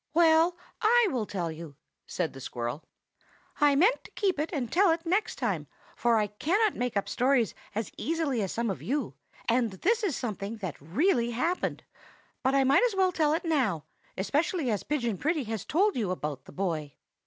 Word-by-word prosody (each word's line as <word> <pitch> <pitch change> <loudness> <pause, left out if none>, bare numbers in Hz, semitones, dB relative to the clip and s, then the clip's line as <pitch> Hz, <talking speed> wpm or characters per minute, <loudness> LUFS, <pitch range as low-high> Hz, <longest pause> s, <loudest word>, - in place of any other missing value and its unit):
"Well, 335 +1 +5 0.2
I 465 +1 +5
will 235 -6 -1
tell 175 -4 -3
you," 160 -2 -9 0.3
said 175 -3 -2
the 135 - -10
squirrel. 120 +2 -4 0.8
"I 290 -1 +5
meant 385 - +3
to - - -14
keep 380 -7 +1
it 305 - -1
and 255 -9 -3
tell 390 +2 +4
it 330 +1 0
next 380 +6 +1
time, - - -2 0.3
for 235 -1 +2
I 210 - +2
cannot 360 - +1
make 245 -3 -1
up 200 - -1
stories 250 -2 +2 0.2
as 220 0 -2
easily 310 -7 0
as 195 - -2
some 230 -2 -1
of - - -6
you, 285 +4 -2 0.3
and 235 0 +2
this 415 - 0
is 360 -10 0
something 210 -2 -4
that 185 -10 -6
really 235 - +1
happened; 325 +10 -1 0.6
but 265 +1 +2
I 275 - +5
might 270 +2 +5
just 485 -5 +2
as - - -7
well 375 -1 +4
tell 310 -4 +2
it 345 +2 -4
now, 245 - +1 0.3
especially 290 - 0
as 205 - -1
Pigeon 240 -9 -1
Pretty 310 +1 0
has 220 -3 -4
told 395 +6 +2
you 215 -6 -1
about 150 -7 -4
the - - -12
boy. 160 -7 -3
255 Hz, 195 wpm, -28 LUFS, 200-330 Hz, 0.8 s, Well